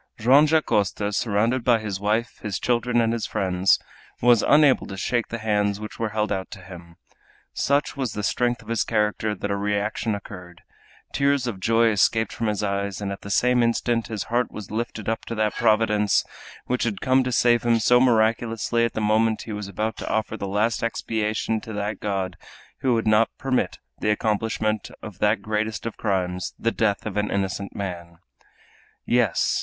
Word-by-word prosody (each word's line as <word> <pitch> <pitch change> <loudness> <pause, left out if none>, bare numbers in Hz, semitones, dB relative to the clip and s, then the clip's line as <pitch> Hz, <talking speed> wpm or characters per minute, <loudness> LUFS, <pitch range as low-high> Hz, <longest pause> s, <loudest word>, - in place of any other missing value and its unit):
Joam 135 +7 +5
Dacosta, 105 -9 +1
surrounded 115 +4 +1
by 120 -1 +4
his 105 -4 -4
wife, 110 +4 -1
his 105 -5 -3
children, 120 0 +1
and 115 0 +2
his 115 -2 -2
friends, 95 0 +2 0.4
was 120 -2 +5
unable 150 -3 +4
to 95 - -7
shake 120 +4 -1
the 115 - -4
hands 105 -2 0
which 105 0 -8
were 115 -1 -1
held 105 0 -1
out 95 -2 -2
to 95 - -10
him. 85 -2 -12 0.6
Such 140 +1 0
was 130 -6 -3
the 105 - -4
strength 120 +4 0
of - - -20
his 115 0 0
character 105 -1 0
that 100 +1 -4
a - - +1
reaction 105 +2 -1
occurred, 90 -4 -10 0.5
tears 140 -2 +2
of 115 -6 -4
joy 115 +3 +3
escaped 110 +2 +2
from 115 - -2
his 105 -1 -1
eyes, 100 -1 -2
and 100 -1 -3
at 100 - -6
the 100 - -8
same 125 +4 +3
instant 115 0 +1
his 110 -3 -4
heart 120 +2 -1
was 105 -3 -8
lifted 110 -1 -4
up 115 0 -1
to 115 - -5
that 110 -1 0
Providence 110 -2 +2 0.4
which 125 0 -1
had 110 -4 -1
come 130 0 +3
to 125 - -2
save 120 0 +3
him 120 -1 +3
so 125 +2 +4
miraculously 115 -1 +2
at 115 - -3
the 110 - -2
moment 110 +1 +2
he 110 - -6
was 105 -1 -5
about 110 +3 -3
to - - -5
offer 110 - -1
the 100 - -5
last 105 +4 0
expiation 110 -1 -1
to 115 - -8
that 105 +1 -3
God 95 -3 -3 0.4
who 130 -3 +2
would 115 - -1
not 110 +1 +4
permit 130 -2 -1 0.2
the - - 0
accomplishment 110 0 0
of 105 -4 -9
that 105 -1 +2
greatest 110 +1 -2
of 115 - -4
crimes, 90 -3 -2
the 115 - 0
death 105 -4 0
of 105 -2 -4
an 105 0 0
innocent 100 0 -3
man! 85 -4 -6 0.9
Yes! 120 -7 +2
110 Hz, 190 wpm, -24 LUFS, 100-115 Hz, 0.9 s, Joam